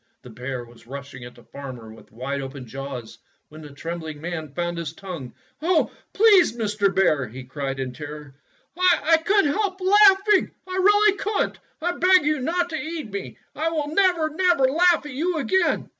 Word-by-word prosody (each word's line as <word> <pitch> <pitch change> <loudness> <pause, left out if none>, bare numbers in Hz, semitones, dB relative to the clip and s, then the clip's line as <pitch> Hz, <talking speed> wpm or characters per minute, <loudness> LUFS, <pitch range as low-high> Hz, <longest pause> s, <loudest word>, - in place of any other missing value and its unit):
The 125 - -11
bear 125 +1 -5
was 120 -1 -18
rushing 135 -2 -8
at 120 0 -12
the 120 - -17
farmer 125 -6 -9
with 110 - -17
wide 135 +5 -4
open 135 -1 -7
jaws 130 -1 -7 0.3
when 155 +1 -12
the 150 - -10
trembling 160 +1 -6
man 160 -2 -5
found 175 +3 -3
his 160 -2 -5
tongue. 165 -10 -8 0.3
"Oh, 330 0 +2 0.2
please, 390 - +5
Mr. 210 -3 +1
Bear," 165 -9 +2
he 125 +4 -9
cried 135 +1 -5
in 130 -1 -4
terror, 150 -1 -9 0.4
"T 335 -3 +4
could 400 0 +4
n't 285 - +1
help 395 -2 -1
laughing! 395 +1 +5 0.2
I 370 - -5
really 415 +1 +4
could 415 +1 0
n't! - - -21 0.2
I 350 - +1
beg 365 -2 +5
you 305 -1 +1
not 345 +6 -1
to 315 - -2
eat 310 -7 -5
me. 200 -1 -6 0.2
I 320 +2 0
will 305 -3 -2
never, 355 -4 +3
never 350 -3 +2
laugh 330 +4 +3
at 295 - -7
you 330 +5 -1
again." 375 +6 +1
205 Hz, 190 wpm, -23 LUFS, -, 0.4 s, please